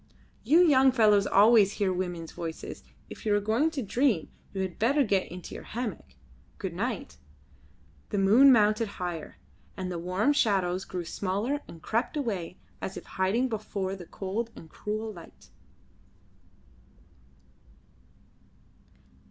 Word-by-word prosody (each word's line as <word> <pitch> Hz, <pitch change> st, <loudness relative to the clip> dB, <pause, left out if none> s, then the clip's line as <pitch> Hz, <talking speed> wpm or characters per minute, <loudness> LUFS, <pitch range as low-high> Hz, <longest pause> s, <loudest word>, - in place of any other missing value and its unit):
"You 335 Hz, +4 st, +5 dB
young 265 Hz, -3 st, +6 dB
fellows 210 Hz, -5 st, +4 dB
always 205 Hz, 0 st, +5 dB
hear 195 Hz, -2 st, 0 dB
women's 175 Hz, -3 st, -4 dB
voices. 165 Hz, -1 st, -7 dB, 0.2 s
If -, -, -11 dB
you 210 Hz, -3 st, +2 dB
are -, -, +3 dB
going 225 Hz, +10 st, +1 dB
to 295 Hz, -5 st, -4 dB
dream 230 Hz, -, +1 dB, 0.2 s
you 195 Hz, -, -3 dB
had 185 Hz, -2 st, -6 dB
better 275 Hz, +6 st, +3 dB
get 200 Hz, -5 st, 0 dB
into 180 Hz, 0 st, -8 dB
your -, -, -8 dB
hammock. 210 Hz, -, -6 dB, 0.4 s
Good -, -, -4 dB
night." -, -, -4 dB, 0.9 s
The -, -, -2 dB
moon 220 Hz, +8 st, +7 dB
mounted 215 Hz, -1 st, +4 dB
higher, 175 Hz, -4 st, -5 dB, 0.4 s
and 185 Hz, -1 st, -4 dB
the 175 Hz, -, -3 dB
warm 185 Hz, +11 st, +1 dB
shadows 190 Hz, -8 st, +1 dB
grew 180 Hz, -2 st, -5 dB
smaller 200 Hz, -, -2 dB
and 165 Hz, -, -12 dB
crept 230 Hz, +7 st, -1 dB
away 195 Hz, -, -3 dB, 0.2 s
as 190 Hz, -, -5 dB
if -, -, -8 dB
hiding 200 Hz, +7 st, 0 dB
before 200 Hz, -4 st, -3 dB
the 175 Hz, -3 st, -11 dB
cold 205 Hz, +4 st, -4 dB
and 160 Hz, -, -13 dB
cruel 215 Hz, +1 st, -4 dB
light. 170 Hz, -3 st, -14 dB
205 Hz, 135 wpm, -28 LUFS, 185-230 Hz, 0.9 s, moon